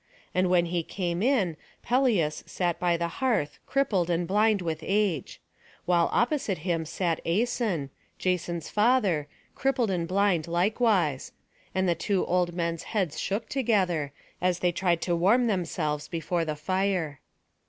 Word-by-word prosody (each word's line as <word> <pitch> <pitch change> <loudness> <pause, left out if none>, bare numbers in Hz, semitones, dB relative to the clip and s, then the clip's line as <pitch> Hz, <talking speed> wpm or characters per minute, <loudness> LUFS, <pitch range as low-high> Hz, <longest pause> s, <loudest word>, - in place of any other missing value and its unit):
And 185 0 +2
when 175 -1 +4
he 170 0 -1
came 175 +1 -3
in, 210 - +2 0.3
Pelias 235 - +2
sat 175 -2 -1
by 175 -1 +2
the 170 0 -1
hearth, 225 - 0
crippled 205 -11 +1
and 170 0 0
blind 210 +2 +3
with 165 -3 -3
age; 195 -5 -1 0.5
while 175 -1 +3
opposite 240 - +1
him 165 -3 0
sat 170 0 -2
Æson, 200 - 0 0.3
Jason's 175 -3 -1
father, 210 - +2 0.3
crippled 255 -5 0
and 170 -2 -1
blind 185 -3 +1
likewise; 180 - +1 0.4
and 190 0 +2
the 175 - +4
two 185 +3 0
old 175 -1 0
men's 170 -1 -1 0.2
heads 180 -7 0
shook 205 +4 -2
together, 185 - +1 0.3
as 180 -1 +2
they 180 -1 +1
tried 175 -1 0
to 175 - +1
warm 205 +9 +4
themselves 165 -7 -1
before 170 0 -2
the 155 -1 -2
fire. 180 -2 -1
180 Hz, 145 wpm, -27 LUFS, 170-205 Hz, 0.5 s, when